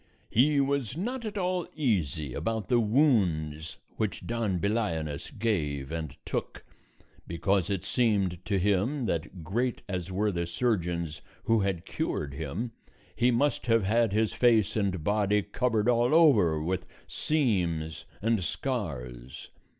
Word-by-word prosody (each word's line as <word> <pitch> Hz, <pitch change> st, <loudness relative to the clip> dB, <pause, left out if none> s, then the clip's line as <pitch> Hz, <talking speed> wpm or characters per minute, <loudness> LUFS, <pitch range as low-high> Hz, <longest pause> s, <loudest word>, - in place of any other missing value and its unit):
He 140 Hz, +5 st, +4 dB
was 140 Hz, -2 st, 0 dB
not 235 Hz, +6 st, -3 dB
at 215 Hz, -1 st, -4 dB
all 180 Hz, -2 st, -1 dB
easy 80 Hz, -, 0 dB
about 110 Hz, -, -2 dB
the 120 Hz, -, +4 dB
wounds 95 Hz, -, +1 dB, 0.2 s
which 105 Hz, -5 st, -2 dB
Don 115 Hz, -5 st, -1 dB
Belianis 85 Hz, -8 st, -1 dB
gave 75 Hz, -11 st, -1 dB
and 80 Hz, -4 st, -4 dB
took, -, -, -4 dB, 0.6 s
because 90 Hz, +3 st, 0 dB
it 100 Hz, -3 st, -1 dB
seemed 100 Hz, -8 st, +1 dB
to 100 Hz, -, +1 dB
him 105 Hz, +8 st, +1 dB
that, 85 Hz, -1 st, -3 dB
great 120 Hz, +9 st, -1 dB
as 95 Hz, -1 st, -4 dB
were 105 Hz, +3 st, +1 dB
the 85 Hz, -2 st, -2 dB
surgeons 85 Hz, -6 st, -1 dB, 0.2 s
who 115 Hz, -1 st, +3 dB
had 95 Hz, -4 st, -1 dB
cured 70 Hz, -1 st, -3 dB
him, 80 Hz, -, -4 dB, 0.4 s
he 120 Hz, +3 st, +3 dB
must 130 Hz, +3 st, +1 dB
have 115 Hz, -2 st, +4 dB
had 115 Hz, +2 st, +2 dB
his 110 Hz, +1 st, +1 dB
face 115 Hz, -5 st, +3 dB
and 95 Hz, -6 st, 0 dB
body 105 Hz, +1 st, +2 dB
covered 115 Hz, -2 st, 0 dB
all 120 Hz, +4 st, +3 dB
over 105 Hz, -, +5 dB
with 90 Hz, +4 st, -2 dB, 0.2 s
seams 85 Hz, -, -1 dB, 0.2 s
and 115 Hz, -3 st, +2 dB
scars. 65 Hz, -, -4 dB
100 Hz, 135 wpm, -29 LUFS, 85-120 Hz, 0.6 s, over